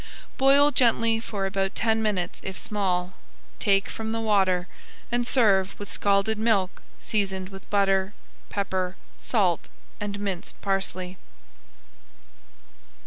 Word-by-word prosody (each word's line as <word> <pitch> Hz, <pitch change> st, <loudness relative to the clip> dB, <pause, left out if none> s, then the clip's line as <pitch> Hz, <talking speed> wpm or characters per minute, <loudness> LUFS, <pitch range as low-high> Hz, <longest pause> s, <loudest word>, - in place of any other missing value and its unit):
Boil 280 Hz, +2 st, +6 dB
gently 230 Hz, -4 st, +3 dB
for 205 Hz, -3 st, -3 dB
about 195 Hz, 0 st, -1 dB
ten 220 Hz, 0 st, +1 dB
minutes 195 Hz, -5 st, -1 dB
if 190 Hz, -1 st, -6 dB
small. 185 Hz, -3 st, -1 dB, 0.5 s
Take 195 Hz, -2 st, +3 dB
from 220 Hz, 0 st, -4 dB
the 225 Hz, -, -1 dB
water, 190 Hz, -5 st, +2 dB, 0.4 s
and 240 Hz, 0 st, +1 dB
serve 200 Hz, -7 st, +3 dB
with 205 Hz, -, -7 dB
scalded 200 Hz, +2 st, +1 dB
milk 210 Hz, -4 st, +1 dB, 0.2 s
seasoned 190 Hz, -3 st, -1 dB
with 195 Hz, -1 st, -12 dB
butter, 195 Hz, 0 st, +2 dB, 0.3 s
pepper, 190 Hz, -2 st, -2 dB, 0.2 s
salt, 190 Hz, -8 st, +1 dB, 0.3 s
and 205 Hz, -1 st, -4 dB
minced 195 Hz, -4 st, -4 dB
parsley. 185 Hz, -2 st, -2 dB
200 Hz, 115 wpm, -26 LUFS, 190-220 Hz, 0.5 s, Boil